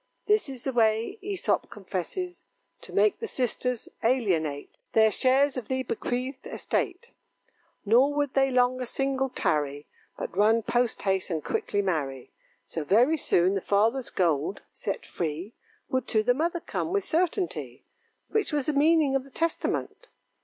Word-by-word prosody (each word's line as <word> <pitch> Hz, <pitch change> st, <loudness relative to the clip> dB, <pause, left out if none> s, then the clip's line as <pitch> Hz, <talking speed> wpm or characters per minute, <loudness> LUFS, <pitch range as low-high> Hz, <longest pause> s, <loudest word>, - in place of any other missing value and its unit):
This 425 Hz, -7 st, +2 dB
is 260 Hz, -3 st, -8 dB
the 270 Hz, -, -2 dB
way, 225 Hz, -, +2 dB
Æsop 390 Hz, -2 st, -1 dB
confesses, 210 Hz, -, -5 dB, 0.4 s
To -, -, -10 dB
make 425 Hz, -, +3 dB
the 455 Hz, -, -4 dB
sisters 250 Hz, -, -1 dB, 0.2 s
alienate 180 Hz, -, 0 dB
Their 220 Hz, -1 st, +5 dB
shares 265 Hz, +4 st, +3 dB
of 245 Hz, -, -5 dB
the 260 Hz, 0 st, -1 dB
bequeathed 255 Hz, +3 st, -3 dB
estate; 375 Hz, +6 st, -2 dB, 0.7 s
Nor 245 Hz, +7 st, +5 dB
would 290 Hz, -2 st, 0 dB
they 270 Hz, 0 st, +3 dB
longer 250 Hz, 0 st, +2 dB
single 270 Hz, +1 st, 0 dB
tarry, 145 Hz, -, -1 dB, 0.3 s
But -, -, -5 dB
run 220 Hz, +3 st, +4 dB
post 240 Hz, 0 st, 0 dB
haste, 190 Hz, -1 st, 0 dB
and 160 Hz, -4 st, -2 dB
quickly 205 Hz, 0 st, -1 dB
marry; 140 Hz, -8 st, -2 dB, 0.3 s
So 160 Hz, -, -4 dB
very 235 Hz, -, +4 dB
soon 185 Hz, -, +2 dB
the 195 Hz, -, -1 dB
father's 225 Hz, +7 st, +1 dB
gold, 165 Hz, 0 st, 0 dB
set 200 Hz, -, -4 dB
free, 170 Hz, +6 st, -4 dB, 0.4 s
Would 260 Hz, 0 st, -1 dB
to 215 Hz, -2 st, +2 dB
the 245 Hz, +2 st, +4 dB
mother 335 Hz, +5 st, -1 dB
come, 325 Hz, -, -3 dB
with 405 Hz, 0 st, +1 dB
certainty, 355 Hz, +2 st, -1 dB, 0.4 s
Which 435 Hz, -5 st, 0 dB
was 290 Hz, -3 st, 0 dB
the 305 Hz, -, 0 dB
meaning 300 Hz, -1 st, +4 dB
of 270 Hz, -, +1 dB
the 275 Hz, -, -15 dB
testament. 330 Hz, -, -2 dB
250 Hz, 155 wpm, -27 LUFS, 200-290 Hz, 0.7 s, Their